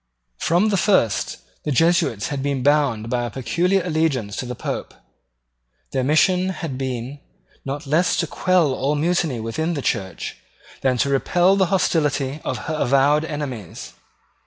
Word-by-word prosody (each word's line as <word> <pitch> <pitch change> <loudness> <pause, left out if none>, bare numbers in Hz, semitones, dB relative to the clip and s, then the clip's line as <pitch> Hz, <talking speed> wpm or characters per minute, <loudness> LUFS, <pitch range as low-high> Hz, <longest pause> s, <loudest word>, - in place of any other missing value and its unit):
From 175 +6 +2
the 200 - +1
first 120 - +2 0.3
the 150 - -2
Jesuits 160 - +2
had 140 -2 -3
been 140 -2 -1
bound 140 -6 +2
by 120 +1 0
a - - -3
peculiar 170 - 0
allegiance 155 - 0
to 125 - -3
the 125 - -5
Pope. - - -5 1.0
Their 130 - 0
mission 180 +6 +3
had 165 -7 -4
been 130 +1 -4 0.5
not 140 +3 -4
less 155 +6 +2
to 170 - +1
quell 170 -3 +2
all 140 +3 0
mutiny 160 -4 0
within 160 +10 -2
the 140 - -4
Church 95 -3 -3 0.4
than 130 -2 +1
to 140 - +1
repel 175 +7 +3
the 190 -2 +2
hostility 150 -6 0
of - - -2
her 160 - -2
avowed 140 +4 +3
enemies. 140 - -6
145 Hz, 155 wpm, -22 LUFS, 130-170 Hz, 1.0 s, mission